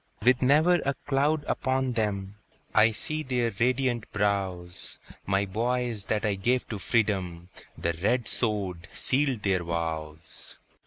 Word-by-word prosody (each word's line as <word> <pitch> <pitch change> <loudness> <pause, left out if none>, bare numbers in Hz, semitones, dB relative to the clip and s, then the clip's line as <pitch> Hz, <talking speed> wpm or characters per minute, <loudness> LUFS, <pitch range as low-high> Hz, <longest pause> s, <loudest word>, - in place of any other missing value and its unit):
With 125 +1 +4
never 155 +7 +5
a 140 0 0
cloud 145 +2 +2
upon 130 0 0
them, 105 -3 -2 0.4
I 110 - +6
see 155 +8 -3
their 125 -4 0
radiant 125 -1 +1
brows; 95 -4 -2 0.3
My 95 +1 +2
boys 115 +1 -1
that 110 -1 0
I 105 - +2
gave 120 +6 0
to 105 - -4
freedom, 95 -6 0 0.3
The 85 - -1
red 105 +8 0
sword 95 -6 -1
sealed 135 -4 0
their 95 -3 +1
vows! 80 -2 -5
110 Hz, 135 wpm, -27 LUFS, 95-125 Hz, 0.4 s, I